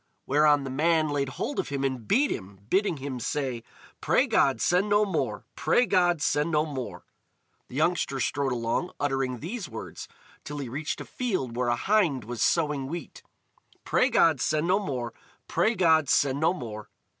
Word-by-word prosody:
Whereon 145 Hz, 0 st, +4 dB
the 135 Hz, -, -5 dB
man 155 Hz, +2 st, +2 dB
laid 140 Hz, -2 st, -1 dB
hold 285 Hz, -, -4 dB
of -, -, -2 dB
him 140 Hz, -1 st, -2 dB
and 130 Hz, -5 st, -2 dB
beat 280 Hz, +6 st, +3 dB
him, 95 Hz, -1 st, -6 dB
bidding 195 Hz, -4 st, +2 dB
him 135 Hz, -2 st, -5 dB
say: 130 Hz, -1 st, -2 dB, 0.4 s
"Pray -, -, +3 dB
God 135 Hz, -1 st, +2 dB
send 180 Hz, +4 st, +2 dB
no 205 Hz, +1 st, +4 dB
more! 195 Hz, -, -2 dB
Pray 245 Hz, -, +2 dB
God 175 Hz, -6 st, +2 dB
send 150 Hz, +2 st, +1 dB
no 155 Hz, -1 st, +2 dB
more!" 125 Hz, -, -6 dB, 0.6 s
The -, -, -11 dB
youngster 155 Hz, -3 st, +1 dB
strode 135 Hz, +3 st, 0 dB
along, 120 Hz, +9 st, -1 dB
uttering 135 Hz, -3 st, -1 dB
these 195 Hz, +4 st, -5 dB
words, -, -, -8 dB, 0.4 s
till 145 Hz, -, -6 dB
he 135 Hz, -4 st, -5 dB
reached 145 Hz, +4 st, -4 dB
a -, -, -7 dB
field 185 Hz, -, -3 dB
where 125 Hz, 0 st, 0 dB
a 120 Hz, -, +2 dB
hind 170 Hz, -, +1 dB
was 120 Hz, +1 st, -6 dB
sowing 150 Hz, -5 st, +1 dB
wheat: 165 Hz, +1 st, -7 dB, 0.6 s
"Pray -, -, +2 dB
God 160 Hz, -6 st, +3 dB
send 155 Hz, +1 st, +1 dB
no 185 Hz, +3 st, +3 dB
more! 130 Hz, -, -4 dB, 0.3 s
Pray 225 Hz, +2 st, +1 dB
God 160 Hz, -, +3 dB
send 140 Hz, +1 st, +2 dB
no 160 Hz, -, +3 dB
more!" 110 Hz, -, -7 dB
145 Hz, 180 wpm, -27 LUFS, 130-170 Hz, 0.6 s, Whereon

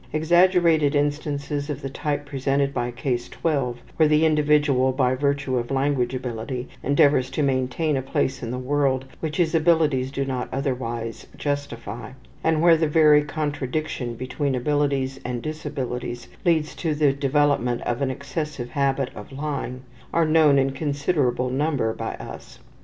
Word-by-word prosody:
Exaggerated 165 Hz, -2 st, +4 dB
instances 145 Hz, 0 st, -1 dB
of 145 Hz, 0 st, -4 dB
the -, -, -2 dB
type 145 Hz, +1 st, -2 dB
represented 140 Hz, 0 st, 0 dB
by 120 Hz, -, -1 dB
Case 120 Hz, +1 st, -2 dB
12, 135 Hz, -7 st, -2 dB
where 155 Hz, -, +5 dB
the 150 Hz, +1 st, +4 dB
individual 150 Hz, -4 st, +3 dB
by 130 Hz, -1 st, +1 dB
the 130 Hz, +1 st, -3 dB
virtue 140 Hz, -2 st, +1 dB
of 120 Hz, 0 st, -2 dB
language 135 Hz, -2 st, 0 dB
ability 125 Hz, 0 st, -4 dB
endeavors 140 Hz, -2 st, +3 dB
to 150 Hz, -, -1 dB
maintain 135 Hz, +3 st, 0 dB
a 135 Hz, -, 0 dB
place 135 Hz, 0 st, -1 dB
in 115 Hz, -, -4 dB
the 125 Hz, -, -3 dB
world 135 Hz, 0 st, 0 dB
which 155 Hz, -2 st, -3 dB
his 175 Hz, -3 st, +2 dB
abilities 155 Hz, -5 st, +3 dB
do 135 Hz, 0 st, -2 dB
not 130 Hz, -2 st, -3 dB
otherwise 120 Hz, -4 st, -3 dB
justify, 120 Hz, -5 st, -4 dB, 0.3 s
and 160 Hz, 0 st, +2 dB
where 170 Hz, -1 st, +7 dB
the 160 Hz, 0 st, +1 dB
very 150 Hz, -1 st, +6 dB
contradiction 145 Hz, -4 st, -3 dB
between 130 Hz, +3 st, -2 dB
abilities 135 Hz, 0 st, 0 dB
and 125 Hz, -1 st, -4 dB
disabilities 125 Hz, -5 st, -4 dB, 0.2 s
leads 160 Hz, -3 st, +2 dB
to 160 Hz, -3 st, -2 dB
the 145 Hz, -2 st, +3 dB
development 140 Hz, -3 st, +1 dB
of 120 Hz, +2 st, -2 dB
an 135 Hz, -, +1 dB
excessive 140 Hz, -1 st, -4 dB
habit 135 Hz, -2 st, 0 dB
of 105 Hz, -, -10 dB
lying, 135 Hz, -3 st, -4 dB, 0.3 s
are 165 Hz, -1 st, +3 dB
known 155 Hz, -2 st, +5 dB
in 135 Hz, 0 st, +2 dB
considerable 140 Hz, -3 st, 0 dB
number 135 Hz, -5 st, 0 dB
by -, -, -4 dB
us. -, -, -10 dB
140 Hz, 155 wpm, -24 LUFS, 130-150 Hz, 0.3 s, where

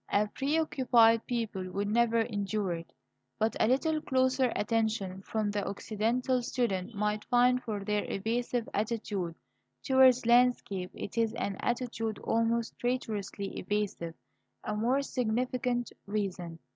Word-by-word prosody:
A 210 Hz, +1 st, +2 dB
preoccupied 255 Hz, -5 st, +3 dB
people 220 Hz, -6 st, -2 dB
would 200 Hz, +1 st, -1 dB
never 230 Hz, +1 st, +3 dB
endure 205 Hz, -3 st, -1 dB
it. 165 Hz, 0 st, -7 dB, 0.5 s
But 220 Hz, +1 st, +1 dB
a -, -, +4 dB
little 310 Hz, +5 st, +2 dB
closer 260 Hz, -2 st, +2 dB
attention 215 Hz, -4 st, -1 dB
from 215 Hz, +1 st, -1 dB
the 205 Hz, -1 st, -1 dB
Occidental 230 Hz, +5 st, 0 dB
student 225 Hz, -4 st, -1 dB
might 210 Hz, +1 st, -1 dB
find 250 Hz, +1 st, +4 dB
for 210 Hz, -5 st, -4 dB
their 210 Hz, 0 st, 0 dB
evasive 235 Hz, +3 st, -1 dB
attitude 205 Hz, -5 st, -2 dB, 0.5 s
towards 260 Hz, -2 st, +5 dB
landscape 235 Hz, -6 st, +3 dB
it 225 Hz, -, -4 dB
is 225 Hz, -1 st, +1 dB
an 200 Hz, -, -2 dB
attitude 235 Hz, -3 st, -2 dB
almost 230 Hz, 0 st, 0 dB
traitorously 215 Hz, -5 st, -3 dB
evasive 190 Hz, -4 st, -2 dB, 0.5 s
a 210 Hz, -, -2 dB
more 250 Hz, +6 st, +1 dB
significant 250 Hz, 0 st, -1 dB, 0.2 s
reason. 190 Hz, -5 st, -3 dB
225 Hz, 125 wpm, -30 LUFS, 205-245 Hz, 0.5 s, towards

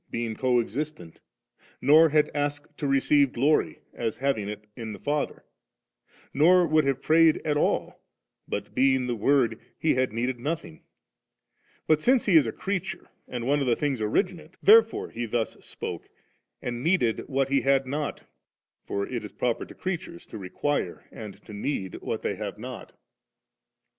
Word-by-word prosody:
being 115 Hz, -1 st, -3 dB
co 125 Hz, +1 st, +2 dB
existent; 120 Hz, -, -5 dB, 0.6 s
nor 155 Hz, +5 st, +6 dB
had 150 Hz, 0 st, +2 dB
asked 145 Hz, 0 st, -3 dB
to 145 Hz, -, -3 dB
receive 140 Hz, 0 st, +3 dB
glory, 145 Hz, +6 st, +1 dB
as 115 Hz, -2 st, -3 dB
having 125 Hz, -7 st, -1 dB
it 105 Hz, 0 st, -7 dB
in 110 Hz, -2 st, -6 dB
the -, -, -9 dB
Father; 145 Hz, 0 st, -2 dB, 0.9 s
nor 175 Hz, +5 st, +5 dB
would 155 Hz, -1 st, +3 dB
have 135 Hz, -1 st, -1 dB
prayed 160 Hz, 0 st, +5 dB
at 150 Hz, -2 st, +1 dB
all; 145 Hz, -, 0 dB, 0.5 s
for, -, -, -1 dB
being 130 Hz, 0 st, +1 dB
the 120 Hz, -1 st, -1 dB
Word, 120 Hz, -1 st, +2 dB, 0.2 s
He 160 Hz, -, +2 dB
had 130 Hz, -2 st, +1 dB
needed 120 Hz, +2 st, -2 dB
nothing; 145 Hz, -, -4 dB, 1.0 s
but 155 Hz, -1 st, +3 dB
since 255 Hz, +4 st, +3 dB
He 195 Hz, -, +3 dB
is 150 Hz, -7 st, +6 dB
a -, -, -1 dB
creature 195 Hz, -, -4 dB, 0.2 s
and 120 Hz, -2 st, -5 dB
one 145 Hz, +2 st, +2 dB
of 125 Hz, -4 st, +2 dB
things 140 Hz, -6 st, -1 dB
originate, 175 Hz, -, -1 dB
therefore 225 Hz, +2 st, +5 dB
He 120 Hz, 0 st, -4 dB
thus 115 Hz, 0 st, -1 dB
spoke, -, -, -6 dB, 0.5 s
and 120 Hz, -1 st, -3 dB
needed 155 Hz, -8 st, +2 dB
w^t 135 Hz, -1 st, +1 dB
He 140 Hz, 0 st, +3 dB
had 135 Hz, 0 st, +3 dB
not; 145 Hz, +3 st, -3 dB, 0.6 s
for 100 Hz, 0 st, -1 dB
it 120 Hz, -3 st, -4 dB
is 105 Hz, -, -8 dB
proper 120 Hz, +2 st, -2 dB
to -, -, -13 dB
creatures 175 Hz, -2 st, -5 dB
to -, -, -9 dB
require 95 Hz, +1 st, -2 dB
and 105 Hz, -3 st, -9 dB
to 105 Hz, -, -10 dB
need 100 Hz, -3 st, -3 dB
what -, -, -4 dB
they -, -, -2 dB
have -, -, -5 dB
not" -, -, -8 dB
27. -, -, -29 dB
135 Hz, 165 wpm, -26 LUFS, 115-155 Hz, 1.0 s, nor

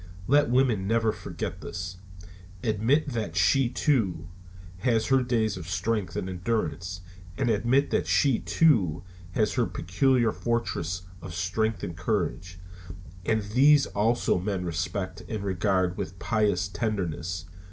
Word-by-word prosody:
Let 145 Hz, +5 st, +4 dB
women 120 Hz, -6 st, +2 dB
never 115 Hz, 0 st, +2 dB
forget -, -, -6 dB
this. 90 Hz, +1 st, -6 dB, 0.7 s
Admit 120 Hz, +8 st, +2 dB
that 110 Hz, -, -3 dB
she, 95 Hz, +9 st, +3 dB
too, 115 Hz, -, 0 dB, 0.5 s
has 115 Hz, 0 st, +2 dB
her 135 Hz, -1 st, +4 dB
days 115 Hz, -5 st, 0 dB
of 85 Hz, -1 st, -7 dB
strength 105 Hz, 0 st, -1 dB
and 90 Hz, -, -2 dB
endurance; 90 Hz, -2 st, -2 dB, 0.4 s
and 130 Hz, -3 st, +1 dB
admit 120 Hz, +6 st, +2 dB
that -, -, +1 dB
she, 135 Hz, -5 st, +3 dB
too, 95 Hz, -, +2 dB, 0.3 s
has 105 Hz, +1 st, +1 dB
her 120 Hz, -3 st, +1 dB
peculiar 115 Hz, +7 st, +1 dB
fortress 90 Hz, -8 st, -2 dB, 0.2 s
of 90 Hz, -3 st, -7 dB
strength 100 Hz, +4 st, -1 dB
and 85 Hz, -, -4 dB
courage, 90 Hz, -2 st, -2 dB, 0.7 s
and 110 Hz, -1 st, +2 dB
these 135 Hz, +7 st, +5 dB
also 110 Hz, -1 st, +1 dB
man 95 Hz, -1 st, -2 dB
respects 90 Hz, +2 st, -3 dB
and 110 Hz, -2 st, -3 dB
regards 95 Hz, -1 st, +1 dB
with 90 Hz, +1 st, -5 dB
piteous 100 Hz, -4 st, +1 dB
tenderness. 90 Hz, -5 st, -3 dB
105 Hz, 130 wpm, -27 LUFS, 90-120 Hz, 0.7 s, these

